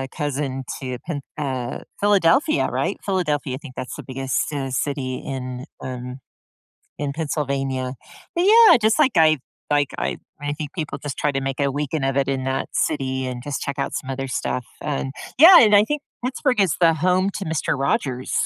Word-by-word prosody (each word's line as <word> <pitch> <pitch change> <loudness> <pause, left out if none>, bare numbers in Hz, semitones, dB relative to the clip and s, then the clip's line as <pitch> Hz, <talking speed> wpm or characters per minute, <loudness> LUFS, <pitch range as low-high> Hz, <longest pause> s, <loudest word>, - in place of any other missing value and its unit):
cousin 140 -3 -2 0.2
to 130 -2 -4
Phin 145 -5 -3 0.2
uh, 130 -4 -3 0.2
Philadelphia. 205 - +3
Right? - - -1
Philadelphia, 150 -9 -1
I - - -5
think 135 -3 -11
that's 125 - -5
the - - -8
biggest 130 0 -2
city 135 -3 -3
city 130 -1 -2
in, 130 -2 -5 0.2
um, 125 0 -6 0.8
in 145 -1 -2
Pennsylvania. 135 -4 -2 0.4
But, 345 +2 +2
yeah, 445 - +8
just, 220 +1 +3
like, 285 -5 +4
I 155 -1 +6 0.3
like 145 -1 +3
I - - -2 0.2
I 145 0 -2
think 150 -1 -6
people 155 -5 -4
just 145 -1 -6
try 150 - +1
to 135 0 -2
make 135 0 -3
a 140 -1 +2
weekend 145 +1 -2
of 135 0 0
it 140 - +2
in 135 -1 -1
that 130 0 -2
city 130 -3 -1
and 125 -1 -5
just 145 0 -4
check 140 0 -4
out 140 - -2
some 135 - -4
other 135 0 -3
stuff. 125 -1 -2 0.2
And, 140 -2 -2 0.3
yeah, 340 +5 +10
and 210 -2 +6
I 205 - +7
think 295 +6 -2 0.2
Pittsburgh 255 -2 0
is 185 -6 +2
the 165 -1 +6
home 185 +4 +2
to 195 - -5
Mister 160 -3 -1
Rogers. 130 -1 -1
140 Hz, 190 wpm, -22 LUFS, 130-165 Hz, 0.8 s, yeah